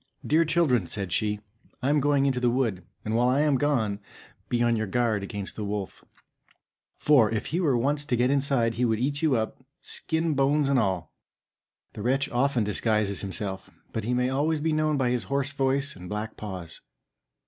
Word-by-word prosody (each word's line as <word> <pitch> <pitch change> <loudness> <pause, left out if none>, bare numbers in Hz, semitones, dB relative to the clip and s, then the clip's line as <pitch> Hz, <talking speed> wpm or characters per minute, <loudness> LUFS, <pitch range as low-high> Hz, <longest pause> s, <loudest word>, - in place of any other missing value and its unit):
"Dear 160 +2 +3
children," 155 -6 +2
said 100 -4 -3
she, 105 +1 0 0.4
"I 135 - +2
am 150 - +3
going 140 -1 +2
out - - +3
into 130 -2 -1
the 125 -1 +2
wood; 115 -8 0 0.2
and 110 +1 -1
while 120 +1 +3
I 130 +3 +3
am 150 -2 +3
gone, 115 -9 +1 0.5
be 120 -1 +1
on 120 0 +3
your 110 -1 -1
guard 115 -1 +1
against 100 0 -5
the 110 - -4
wolf, 100 -1 -4 0.9
for 135 -8 +4
if 110 -1 -2
he 175 - +1
were 140 -8 +2
once 145 +4 +1
to 125 - 0
get 125 +2 +2
inside 135 -5 +2
he 120 - -1
would 110 -2 +2
eat 140 +5 -1
you 155 -5 +3
up, 110 +3 -3 0.2
skin, 160 -1 0
bones, 140 +1 +2
and 135 -2 +3
all. 95 -7 -1 0.8
The - - -7
wretch 135 +5 +1
often 125 -1 +1
disguises 105 -1 0
himself, 95 -1 -4 0.2
but 110 - -2
he 120 +3 0
may 125 +1 +1
always 150 +4 +1
be 160 +1 0
known 155 -1 +1
by 125 -3 +1
his 125 -1 -1
hoarse 140 0 -1
voice 135 +1 0
and 90 -1 -10
black 105 +1 -4
paws." 90 -6 -7
125 Hz, 200 wpm, -26 LUFS, 110-140 Hz, 0.9 s, for